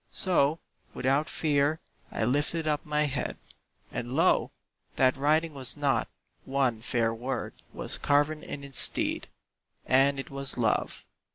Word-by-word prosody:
So, 160 -4 +2 0.4
without 140 +4 +1
fear 150 0 +1 0.3
I - - -2
lifted 145 +7 0
up 150 -1 0
my 150 0 +1
head, 140 -3 -2 0.5
And 120 +1 -4
lo! 165 +6 +3 0.5
that 130 -1 +4
writing 155 +4 +1
was 135 0 0
not, 145 -2 +1 0.4
one 130 -4 0
fair 115 -1 0
word 125 +4 -4 0.2
Was - - -3
carven 145 +2 +2
in 145 -3 -7
its 140 -2 -1
stead, - - +1 0.6
and 135 +1 +3
it 135 - -7
was 135 -1 -3
"Love." 115 -3 0
140 Hz, 135 wpm, -28 LUFS, 130-150 Hz, 0.6 s, that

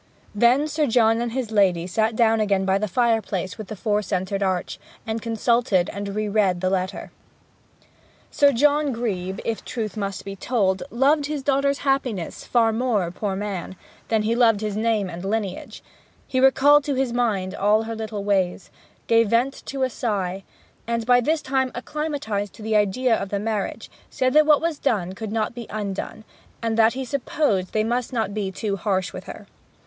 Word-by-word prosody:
Then 240 +7 +3
Sir 305 -1 0
John 225 -1 +3
and 240 -1 -2
his 245 -2 -3
lady 185 -5 +3
sat 220 +5 0
down 225 -1 +3
again 200 -3 +1
by 190 +1 +2
the 215 - -1
fireplace 220 -4 0
with 215 - -6
the 215 - -6
four 210 +1 0
centred 195 0 -2
arch, 185 -2 -1 0.3
and 225 0 -3
consulted, 225 -4 +1
and 200 0 -5
re 215 0 -1
read 200 -4 +2
the 185 +1 0
letter. 185 0 -2 1.2
Sir 285 -1 +4
John 290 +2 +2
Grebe, 195 -5 -3
if 225 -1 -1
the - - -20
truth 220 -3 -4
must 200 -2 -4
be 195 0 -6
told, 195 -3 0
loved 285 +4 +2
his 295 -2 -4
daughter's 280 0 +2
happiness 255 -10 -1
far 230 -2 +2
more, 220 -7 0
poor 195 +1 -3
man, 195 -2 -4 0.3
than 220 -2 +1
he 220 +2 +1
loved 225 -4 +4
his 210 -2 -2
name 215 -2 +1
and 175 0 -7
lineage; 200 -2 -4 0.4
he 260 - -1
recalled 275 +2 +5
to 285 - -1
his 260 -2 0
mind 205 -6 0
all 210 +2 +2
her 225 0 -5
little 215 -2 -5
ways, 190 -2 0 0.3
gave 230 -2 +3
vent 245 +5 +1
to 270 -1 -2
a 260 - +1
sigh; 195 -5 -2 0.4
and, 230 -1 -1
by 245 +1 +5
this 305 +4 0
time 265 -1 0
acclimatized 245 -7 -3
to 215 - -11
the 220 0 0
idea 210 +4 +2
of 195 -2 -4
the 200 - -1
marriage, 210 -1 -3 0.2
said 255 0 0
that 305 0 +5
what 300 -2 +5
was 330 -3 -1
done 190 -9 0
could 215 +1 -6
not 220 0 -1
be 235 -2 -8
undone, 210 +1 -5 0.4
and 230 -1 -1
that 225 0 +4
he 265 +1 -4
supposed 250 -8 -1
they 215 - +2
must 240 +2 -1
not 220 -5 -1
be 200 -2 -2
too 200 +1 -2
harsh 190 -1 -1
with - - -8
her. - - -9
220 Hz, 190 wpm, -23 LUFS, 200-250 Hz, 1.2 s, recalled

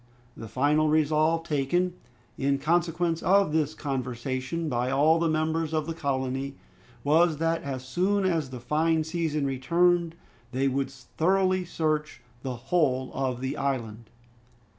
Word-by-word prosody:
The 115 - -8
final 145 +7 +2
resolve 155 +1 +2
taken, 165 +4 0 0.4
in 140 0 +1
consequence 170 +2 0
of 195 -3 +3
this 155 -1 +1
conversation, 130 +3 -3
by 125 -2 0
all 150 +5 +4
the 165 -1 +1
members 160 0 0
of 155 -1 0
the 165 - -3
colony, 135 -2 -2 0.5
was 160 +2 +3
that 165 +1 0
as 130 -4 -5
soon 190 +7 +1
as 165 -7 0
the 125 -1 -7
fine 155 +6 +1
season 160 -3 -1
returned 170 +5 +2 0.4
they 135 +2 +1
would 135 0 0
thoroughly 185 +8 0
search 155 -6 -2 0.2
the 130 -2 -4
whole 130 -1 0
of 130 -2 -2
the 130 +2 -2
island. 115 -5 -3
150 Hz, 140 wpm, -27 LUFS, 135-165 Hz, 0.5 s, all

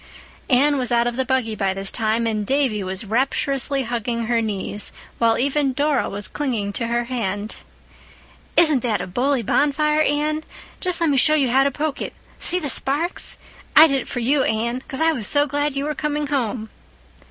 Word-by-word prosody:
Anne 280 +2 +3
was 250 -1 -1
out 235 0 +3
of 240 0 -2
the 260 - 0
buggy 255 -4 -1
by 195 -2 -1
this 195 0 -2
time, 225 0 0
and 215 -2 -1
Davy 265 -7 0
was 190 +2 -5
rapturously 270 +4 0
hugging 235 0 -3
her 230 0 +1
knees, 205 -1 -3 0.3
while 230 -1 +3
even 275 +1 0
Dora 290 0 0
was 200 -1 -3
clinging 225 -8 -3
to 230 +3 -3
her 235 +1 0
hand. 215 -4 -4 1.0
"Isn't 310 -5 +6
that 230 -3 -1
a - - -4
bully 250 +6 0
bonfire, 300 +5 +1
Anne? 305 +1 0 0.4
Just 365 -2 +1
let 325 -3 +2
me 275 - +1
show 305 +4 +5
you 270 -5 +1
how 265 +2 +4
to 280 - +2
poke 295 +1 -3
it—see 360 - +1
the 305 - -4
sparks? 290 +6 -1 0.4
I 315 - +10
did 275 -4 +1
it - - -10
for 245 - -4
you, 270 +4 +2
Anne, 235 +2 -1
'cause 270 - -3
I 325 0 +4
was 240 -9 -1
so 290 0 +3
glad 290 0 -2
you 275 +1 -2
were 300 - -2
coming 300 0 -2
home." 240 -6 -2
260 Hz, 195 wpm, -21 LUFS, 230-290 Hz, 1.0 s, I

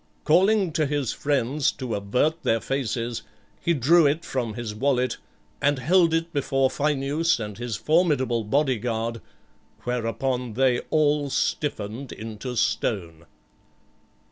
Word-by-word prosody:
Calling 190 +3 +3
to 155 -1 +1
his 145 -4 -1
friends 140 0 0
to 130 -5 -5
avert 125 +11 0
their 115 - +1
faces, 120 -2 -2 0.4
he 170 - +1
drew 155 +4 +5
it 155 +4 -1
from 120 -5 -3
his 115 -2 -4
wallet, 125 +2 0 0.4
and 145 0 +2
held 165 +6 +3
it 165 +1 -1
before 135 -2 +1
Phineus 150 +3 +1
and 105 -1 -6
his 120 -2 -3
formidable 145 -8 +2
body 130 +2 +1
guard, 115 0 -2 0.6
whereupon 125 0 -2
they 125 0 +2
all 150 -2 +2
stiffened 130 -3 -2
into 110 +3 -6
stone. 90 -7 -1
130 Hz, 125 wpm, -25 LUFS, 115-150 Hz, 0.6 s, drew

